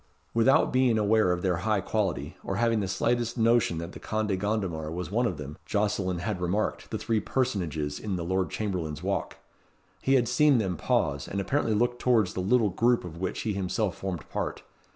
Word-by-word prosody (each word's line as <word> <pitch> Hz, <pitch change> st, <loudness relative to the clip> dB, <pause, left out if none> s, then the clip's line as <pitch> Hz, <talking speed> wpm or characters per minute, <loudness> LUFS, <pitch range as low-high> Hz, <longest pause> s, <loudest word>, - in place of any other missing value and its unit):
Without 115 Hz, +4 st, +4 dB
being 125 Hz, -3 st, +3 dB
aware 110 Hz, -2 st, +3 dB
of 90 Hz, 0 st, -1 dB
their 90 Hz, -3 st, +1 dB
high 105 Hz, +3 st, +1 dB
quality, 95 Hz, -2 st, -2 dB
or -, -, -3 dB
having 115 Hz, -1 st, +2 dB
the 100 Hz, -, -1 dB
slightest 120 Hz, +4 st, 0 dB
notion 115 Hz, -6 st, +3 dB
that 85 Hz, +1 st, -5 dB
the -, -, -10 dB
Conde 105 Hz, -3 st, -1 dB
Gondomar 95 Hz, -7 st, -2 dB
was 90 Hz, 0 st, -4 dB
one 120 Hz, +3 st, +2 dB
of 90 Hz, -, -3 dB
them, 75 Hz, 0 st, -8 dB
Jocelyn 100 Hz, -3 st, 0 dB
had 90 Hz, +1 st, -3 dB
remarked 95 Hz, +5 st, -1 dB
the -, -, -2 dB
three 115 Hz, -1 st, 0 dB
personages 85 Hz, -, -1 dB
in 105 Hz, -3 st, -3 dB
the 85 Hz, -2 st, -3 dB
Lord 95 Hz, +1 st, 0 dB
Chamberlain's 85 Hz, -7 st, -3 dB
Walk. 100 Hz, +1 st, -2 dB, 0.6 s
He 135 Hz, -, +3 dB
had 120 Hz, -3 st, +3 dB
seen 140 Hz, +3 st, +4 dB
them 95 Hz, -5 st, 0 dB
pause, 70 Hz, -2 st, 0 dB
and 100 Hz, -, -3 dB
apparently 115 Hz, +1 st, 0 dB
look 120 Hz, +2 st, +1 dB
towards 110 Hz, -7 st, +2 dB
the -, -, -4 dB
little 105 Hz, +4 st, +3 dB
group 120 Hz, +3 st, +2 dB
of 85 Hz, -1 st, -8 dB
which 95 Hz, +1 st, -3 dB
he 110 Hz, -, -1 dB
himself 100 Hz, +1 st, -1 dB
formed 95 Hz, -5 st, -5 dB
part. -, -, -4 dB
100 Hz, 195 wpm, -28 LUFS, 90-115 Hz, 0.6 s, Without